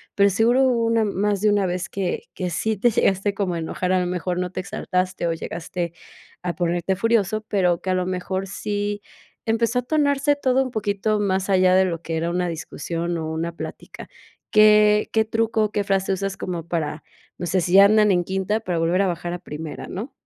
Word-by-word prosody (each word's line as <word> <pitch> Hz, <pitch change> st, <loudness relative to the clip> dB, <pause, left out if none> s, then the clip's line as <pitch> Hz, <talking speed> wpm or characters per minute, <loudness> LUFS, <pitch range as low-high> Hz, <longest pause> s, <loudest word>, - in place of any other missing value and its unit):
pero, 200 Hz, 0 st, +4 dB
seguro 235 Hz, +6 st, +3 dB
hubo 240 Hz, -3 st, +2 dB
una 230 Hz, -1 st, +2 dB
más 200 Hz, 0 st, 0 dB
de 215 Hz, -, +4 dB
una 200 Hz, -2 st, +2 dB
vez, 180 Hz, +1 st, -3 dB
que 190 Hz, -3 st, -3 dB
que 180 Hz, -1 st, -3 dB
sí 220 Hz, +6 st, -1 dB
te 240 Hz, +4 st, +3 dB
llegaste 200 Hz, -1 st, +1 dB
como 195 Hz, -3 st, -1 dB
a 170 Hz, -, -2 dB
enojar, 180 Hz, +3 st, -2 dB
a 185 Hz, -, +3 dB
lo 180 Hz, -, -1 dB
mejor 180 Hz, 0 st, -2 dB
no 180 Hz, 0 st, -2 dB
te 185 Hz, -, -4 dB
exaltaste, 185 Hz, -2 st, -2 dB
o 165 Hz, -, 0 dB
llegaste 170 Hz, +1 st, -5 dB, 0.5 s
a 175 Hz, -1 st, -3 dB
ponerte 175 Hz, +1 st, 0 dB
furioso, 215 Hz, 0 st, +1 dB
pero, 180 Hz, -4 st, +1 dB
que 185 Hz, -, -2 dB
a -, -, +2 dB
lo 185 Hz, 0 st, 0 dB
mejor 185 Hz, +1 st, -3 dB
sí 205 Hz, +1 st, -3 dB, 0.4 s
empezó 230 Hz, +2 st, +1 dB
a -, -, -1 dB
tornarse 285 Hz, 0 st, +2 dB
todo 265 Hz, -2 st, +2 dB
un 260 Hz, -, -4 dB
poquito 210 Hz, -1 st, -1 dB
más 195 Hz, -1 st, 0 dB
allá 185 Hz, -1 st, +4 dB
de 190 Hz, 0 st, +5 dB
lo 170 Hz, -3 st, -3 dB
que 165 Hz, -1 st, -4 dB
era 165 Hz, +1 st, -1 dB
una 180 Hz, 0 st, 0 dB
discusión, 170 Hz, +1 st, -4 dB
o 160 Hz, -1 st, -4 dB
una 165 Hz, +1 st, -2 dB
plática, -, -, -8 dB, 0.4 s
¿qué 210 Hz, 0 st, +5 dB
qué 220 Hz, 0 st, +2 dB
truco 225 Hz, 0 st, 0 dB
o 210 Hz, -, -4 dB
qué 205 Hz, -1 st, 0 dB
frase 195 Hz, 0 st, 0 dB
usas 195 Hz, 0 st, -3 dB
como 170 Hz, -2 st, -5 dB
para, 155 Hz, -3 st, -3 dB, 0.4 s
no 175 Hz, -, -3 dB
sé 185 Hz, +2 st, +1 dB
si 175 Hz, +2 st, -2 dB
ya 195 Hz, +1 st, +9 dB
andan 210 Hz, 0 st, +5 dB
en 175 Hz, -1 st, +2 dB
quinta 190 Hz, +4 st, -1 dB
para 180 Hz, -5 st, -2 dB
volver 170 Hz, +3 st, +2 dB
a 195 Hz, -, +2 dB
bajar 175 Hz, 0 st, -3 dB
a 175 Hz, -, -5 dB
primera, 155 Hz, -2 st, -7 dB
no? 220 Hz, +9 st, -6 dB
190 Hz, 215 wpm, -23 LUFS, 175-210 Hz, 0.5 s, ya